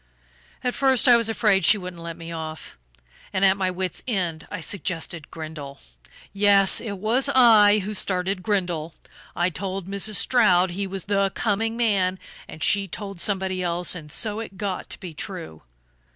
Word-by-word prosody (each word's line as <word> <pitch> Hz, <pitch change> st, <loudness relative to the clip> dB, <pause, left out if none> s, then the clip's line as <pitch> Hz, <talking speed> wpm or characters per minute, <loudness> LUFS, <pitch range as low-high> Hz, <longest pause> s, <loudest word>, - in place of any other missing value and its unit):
At 250 Hz, -, 0 dB
first 265 Hz, -2 st, +3 dB
I 245 Hz, -, +8 dB
was 230 Hz, -1 st, +2 dB
afraid 210 Hz, -4 st, +2 dB
she 210 Hz, -, +6 dB
wouldn't 180 Hz, -3 st, -8 dB
let 165 Hz, 0 st, -7 dB
me 165 Hz, 0 st, -8 dB
off 160 Hz, -1 st, -7 dB, 0.6 s
and 190 Hz, +1 st, +2 dB
at 190 Hz, 0 st, +5 dB
my 190 Hz, -2 st, 0 dB
wits' 185 Hz, 0 st, -3 dB
end 175 Hz, -9 st, -2 dB
I -, -, -5 dB
suggested 170 Hz, -3 st, -3 dB
Grindle. 155 Hz, -4 st, -8 dB, 0.5 s
Yes, 200 Hz, -1 st, +4 dB
it 205 Hz, -4 st, -5 dB
was 235 Hz, +8 st, 0 dB
I 215 Hz, -4 st, +6 dB
who 210 Hz, -, -4 dB
started 185 Hz, -1 st, -1 dB
Grindle: 175 Hz, -6 st, -2 dB, 0.4 s
I 175 Hz, +1 st, +1 dB
told 190 Hz, +3 st, -4 dB
Mrs. 200 Hz, +2 st, -2 dB
Stroud 190 Hz, -8 st, +4 dB
he 195 Hz, +2 st, -3 dB
was 190 Hz, -2 st, -5 dB
the 200 Hz, -1 st, +1 dB
'coming' 225 Hz, +1 st, -1 dB
man, 195 Hz, -6 st, +1 dB, 0.3 s
and 155 Hz, -, -8 dB
she 195 Hz, +8 st, +2 dB
told 195 Hz, 0 st, -7 dB
somebody 190 Hz, -1 st, -1 dB
else, 175 Hz, 0 st, 0 dB
and 155 Hz, -4 st, -8 dB
so 215 Hz, +4 st, -2 dB
it 220 Hz, -4 st, -8 dB
got 195 Hz, -1 st, -4 dB
to -, -, -4 dB
be 180 Hz, -5 st, -8 dB
true.... 80 Hz, -, -7 dB
190 Hz, 170 wpm, -24 LUFS, 175-210 Hz, 0.6 s, I